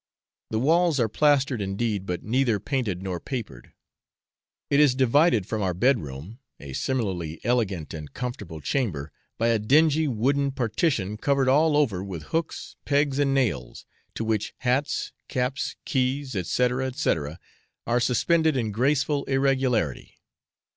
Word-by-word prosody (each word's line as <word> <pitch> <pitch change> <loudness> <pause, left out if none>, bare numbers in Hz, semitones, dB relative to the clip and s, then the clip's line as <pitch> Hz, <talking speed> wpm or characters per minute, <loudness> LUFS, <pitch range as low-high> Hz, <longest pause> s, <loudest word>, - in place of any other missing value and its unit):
The 110 - -1
walls 160 +4 +3
are 115 - +3
plastered 140 -1 +2
indeed, 100 0 -2
but 90 -1 -3
neither 120 -1 +1
painted 110 -7 -2
nor 90 -2 -3
papered; 110 - -6 1.0
it 140 - +4
is 145 -4 +5
divided 130 - +3
from 110 +1 -3
our 95 -3 0
bed 125 +7 +3
room 75 - -9 0.2
(a 70 -2 -9
similarly 90 - -2
elegant 105 -10 -1
and 75 -2 -7
comfortable 105 -11 -6
chamber) 80 - -2 0.3
by 115 +1 +2
a 115 -1 +2
dingy 155 +7 +3
wooden 140 +3 +1
partition 115 - 0
covered 140 +2 +1
all 150 +3 +4
over 110 -11 +1
with 90 -6 -6
hooks, 165 0 -3
pegs, 145 -1 +1
and 140 -1 +2
nails, 70 - -1 0.3
to - - -2
which 110 -2 -1
hats, 130 +3 0 0.2
caps, 130 +1 -2
keys, 130 0 0
&c. 95 -6 -2 0.5
&c., 155 - +2 0.7
are 120 +1 +2
suspended 155 +5 +2
in 110 -4 -1
graceful 140 +5 +1
irregularity. 130 - 0
125 Hz, 140 wpm, -25 LUFS, 100-140 Hz, 1.0 s, is